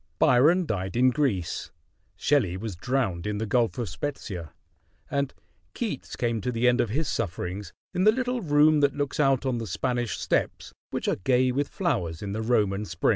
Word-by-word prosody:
Byron 160 +9 +5
died 95 -7 -3
in 130 +1 +5
Greece, 115 - -1 0.5
Shelley 120 -12 +1
was 105 -1 -5
drowned 95 -4 -1
in 105 0 -1
the 110 - -2
Gulf 115 +2 +1
of 120 -3 -2
Spezia 145 +11 -3
(spet´ - - -20
see 100 -5 -4
eh), 85 - -6 0.7
and 140 -1 0 0.4
Keats 215 - -4
came 115 -2 -1
to 125 - -1
the 120 +1 +1
end 125 +1 +4
of 115 - -1
his 145 +7 -1
sufferings 90 -2 -3 0.2
in 185 - +1
the 215 - +8
little 250 +1 -1
room 150 -1 +4
that 145 -1 +2
looks 145 0 -2
out 135 -2 +3
on 125 -3 0
the 115 - -4
Spanish 120 +5 -1
steps - - -1 0.2
which - - -3
are - - +1
gay 125 +5 +2
with 140 +3 0
flowers 90 - -2
in 100 - -4
the 110 - -2
Roman 105 -4 +1
spring. - - 0
125 Hz, 200 wpm, -26 LUFS, 100-145 Hz, 0.7 s, the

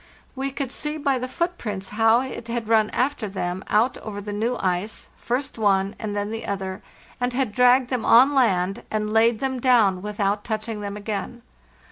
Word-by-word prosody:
We 270 +1 -2
could 270 -1 -4
see 300 +2 -3
by 280 -3 0
the 255 - -3
footprints 235 - -3
how 225 +2 +4
it 255 -3 -6
had 235 -1 -3
run 220 -1 +3
after 255 -4 -1
them 185 -1 -3
out 225 +4 +2
over 205 -2 -6
the 205 0 -6
new 230 +4 -1
ice, 185 +3 -2
first 260 +1 -3
one 195 -1 +2
and 210 -2 -4
then 205 +1 -2
the 225 0 -5
other, 190 -1 -4 0.4
and 245 0 -1
had 255 -3 0
dragged 250 +3 +4
them 250 -3 -1
on 260 +5 +6
land, 195 -6 +2
and 215 0 -2
laid 225 0 +4
them 265 -1 -1
down 225 -8 +4
without 205 0 -1
touching 220 -1 -4
them 200 0 -5
again. 215 +3 -5
225 Hz, 185 wpm, -24 LUFS, 205-250 Hz, 0.4 s, on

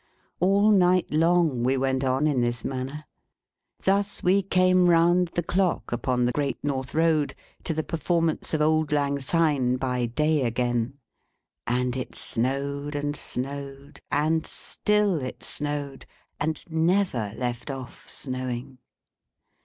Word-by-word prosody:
All 200 +4 +4
night 185 -2 +3
long 165 -4 +3
we 130 +2 +2
went 130 0 0
on 130 +2 +1
in 145 -5 +2
this 120 -1 -1
manner. 135 +3 -4 0.8
Thus 200 +1 +1
we 190 +2 +4
came 185 -1 +3
round 175 +1 +4
the 175 - 0
clock, 180 +1 0
upon 125 +1 0
the 125 - +2
Great 140 -1 -1
North 135 -2 -3
Road, 160 -3 +2 0.3
to - - -1
the 155 - -1
performance 165 0 0
of 150 - +1
Auld 155 0 +2
Lang 140 -1 +1
Syne 140 -4 +1
by 125 -2 -1
day 150 +4 +1
again. 120 +1 -1 0.7
And 125 +1 0
it 130 - -5
snowed 140 +4 -2
and 145 0 -2
snowed, 140 +1 -4
and 155 +2 +1
still 210 -6 0
it 130 - -6
snowed, 145 -2 -3 0.3
and 155 +1 -2
never 160 - +1
left 120 +1 -3
off 135 -2 -8
snowing. 130 -1 -5
145 Hz, 135 wpm, -26 LUFS, 130-165 Hz, 0.8 s, All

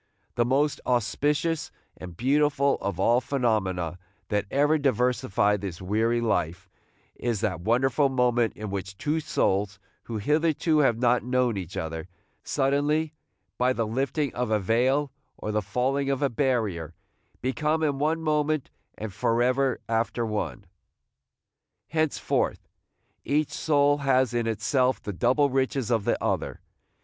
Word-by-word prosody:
The 120 - +1
most 140 +4 +1
auspicious 145 +7 0 0.3
and 90 -2 -10
beautiful 140 +1 +2
of 100 -2 -3
all 120 +5 +3
phenomena 95 - -1 0.3
that 105 -1 0
ever 145 +3 +3
diversify 125 -6 +1
this 95 -4 -6
weary 110 +5 +1
life 90 -5 -1 0.5
is 115 -5 -2
that 90 -5 -1
wonderful 130 - +2
moment 125 -3 +2
in 105 -2 -6
which 100 0 -5
two 150 +7 0
souls, 100 -8 0 0.3
who 115 - -4
hitherto 155 +6 +2
have 125 -6 +3
not 125 0 +2
known 125 -2 +1
each 90 -3 -6
other, 80 0 -4 0.4
suddenly, 145 +3 +1 0.5
by 125 +1 +3
the 115 -3 -1
lifting 135 +5 -1
of 125 -1 -2
a 110 - +3
veil 130 +8 +1 0.3
or 105 - -4
the 105 0 0
falling 135 +6 -1
of 140 +1 0
a 140 - +3
barrier, 110 - -1 0.5
become 150 +5 0
in 145 -3 0
one 160 +2 0
moment 150 -2 0 0.3
and 105 -2 -6
forever 125 +5 +1
after 115 +1 0
one. 105 - -3 1.2
Henceforth 155 -1 0 0.6
each 150 0 0
soul 145 -1 +2
has 130 -3 +2
in 120 -1 0
itself 125 +4 +1
the 105 - -6
double 130 +8 +2
riches 130 -2 0
of 115 -3 +1
the - - +2
other. - - -1
125 Hz, 140 wpm, -26 LUFS, 105-140 Hz, 1.2 s, all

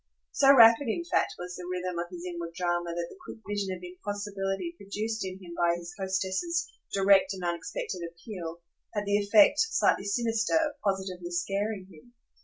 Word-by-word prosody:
So 275 -1 +6
rapid 235 0 +8
in 285 +10 -1
fact - - +1
was 180 0 -6
the 180 - -7
rhythm 180 -1 -3
of 175 - -2
his 175 -1 -8
inward 170 -2 -5
drama 175 -1 -1
that 170 0 -2
the 380 - -14
quick - - -9
vision 205 -2 -2
of 180 -1 -6
impossibility 200 - -4
produced 215 -1 -3
in 185 -1 -4
him 180 -3 -10
by 170 0 +2
his 175 0 -8
hostess's 190 - -1 0.2
direct 195 0 +4
and 185 - -8
unexpected 175 +1 -3
appeal 170 -1 -8 0.3
had 205 0 -1
the 205 0 +3
effect, 205 +7 +5
slightly 450 - +2
sinister, 225 +3 +1
of 305 -3 +1
positively 190 -3 -2
scaring 195 +3 -2
him. 240 +10 -18
195 Hz, 175 wpm, -29 LUFS, 175-215 Hz, 0.3 s, rapid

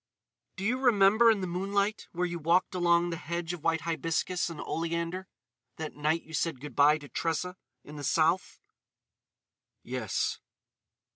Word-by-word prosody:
"Do 190 - -6
you 250 +4 +1
remember 225 -2 +5
in 215 -3 +3
the - - -1
moonlight 200 +4 -1
where 180 +1 -1
you 175 -1 -3
walked 170 +5 +2
along 175 -1 +3
the 165 - -3
hedge 170 +1 -4
of 170 -3 -8
white 165 -1 +1
hibiscus 170 +2 -1
and 165 - -8
oleander—that 165 -5 -5
night 155 +3 0
you 160 - -14
said 160 -4 -1
good 145 -2 -9
bye 145 +2 +6
to 145 -2 -11
Tressa 165 +7 -2 0.3
in 150 +1 -10
the 145 - -6
South?" 160 +6 +1 1.2
"Yes." - - -2
170 Hz, 150 wpm, -29 LUFS, 155-185 Hz, 1.2 s, bye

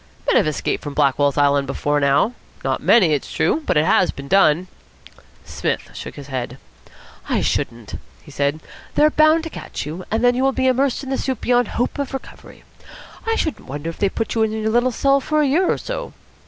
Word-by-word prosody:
"Men - - +3
have - - +3
escaped 155 - -2
from 145 -1 -6
Blackwell's 145 0 +2
Island 140 -1 +3
before 145 +2 0
now. 140 - +2 0.3
Not - - -1
many, 185 -10 +5
it's 145 - -2
true; 320 - +1
but - - +2
it 150 - +3
has 185 - +3
been 140 0 -7
done." 180 -1 +3 0.8
Psmith - - -3
shook - - -8
his 145 - -9
head. 130 -2 -5 0.7
"I - - +1
shouldn't," 115 -2 -2 0.3
he - - -14
said. 145 +2 -1 0.3
"They're 305 +1 +4
bound 310 +2 +4
to 325 - -6
catch - - -6
you, 160 +5 -6
and 225 +2 -1
then 245 0 +5
you 250 - -1
will 270 0 +2
be 260 - 0
immersed 260 +1 +1
in 265 - -6
the 265 - -1
soup 260 -4 -3
beyond 245 -2 +2
hope 245 +4 -2
of 280 -1 -3
recovery. 270 - -11 0.6
I 450 - +2
shouldn't 315 -8 -3
wonder 145 +5 -5
if - - -16
they 200 - +2
put 225 - -3
you 225 - 0
in 220 -1 +2
your 220 0 -1
little 240 +2 +3
cell 275 +3 +2
for 305 +2 +1
a - - +2
year 345 +7 +2
or - - 0
so." - - -6
220 Hz, 215 wpm, -20 LUFS, -, 0.8 s, many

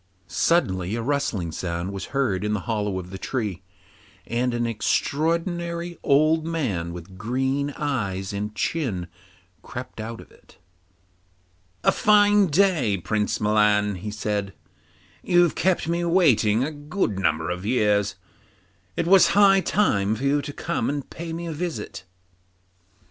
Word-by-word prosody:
Suddenly 95 - +1
a 115 - -2
rustling 120 - -1
sound 85 +3 -4
was 100 - -5
heard 120 -9 -1
in 105 0 0
the 105 - -1
hollow 105 -3 -2
of 90 0 -7
the 95 - -7
tree, 105 -8 -3 0.6
and 125 +2 0
an 120 0 -1
extraordinary 170 - -1
old 155 +3 +3
man 125 - -2
with 90 +2 -10
green 130 +6 -1
eyes 100 -9 -2
and 105 +1 -4
chin 110 - -1 0.6
crept 120 -1 -8
out 115 +1 -6
of - - -14
it. - - -22 1.3
'A - - +5
fine 205 -1 +4
day, 155 - +2
Prince 105 +4 -1
Milan,' 105 -1 +3
he 95 +3 -6
said; 105 -2 -3 0.7
'you've 175 -2 +3
kept 185 -3 +1
me 170 +1 0
waiting 130 - +3
a 150 - -2
good 145 - -2
number 80 -2 0
of 90 +1 -4
years; 105 -3 +1 0.8
it - - 0
was 190 +2 +6
high 195 -1 +7
time 110 - +1
for 130 - -7
you 140 +1 +2
to 145 - -6
come 170 +3 -2
and 145 -1 -4
pay 170 0 -6
me 170 +1 -5
a 165 - -4
visit. 160 - -5
120 Hz, 145 wpm, -24 LUFS, 100-165 Hz, 1.3 s, high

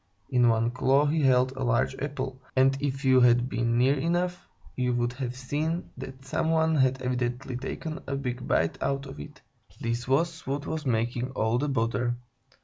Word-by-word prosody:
In 125 -1 +4
one 115 +1 +2
claw 135 +3 +3
he 155 +2 +1
held 130 -1 +4
a 130 0 -5
large 125 +1 +1
apple, 135 -2 -4
and 135 +1 +4
if 140 -1 -2
you 130 -1 +6
had 120 0 +5
been 120 -2 0
near 130 +3 +4
enough, 175 +3 -1 0.3
you 125 -1 0
would 120 0 0
have 125 -1 -4
seen 150 +6 -2
that 135 0 -9
some 145 +4 -1
one 160 0 +3
had 130 -3 +2
evidently 125 0 -2
taken 155 +5 -5
a 140 - -2
big 125 -2 -4
bite 80 0 +1
out 140 0 -1
of 135 +1 -9
it. 150 0 -11 0.4
This 120 +1 -2
was 165 +5 0
what 140 +2 -2
was 155 -3 -3
making 120 +1 0
all 110 0 +1
the 145 +2 -1
bother. 120 -1 0
130 Hz, 185 wpm, -27 LUFS, 125-140 Hz, 0.4 s, you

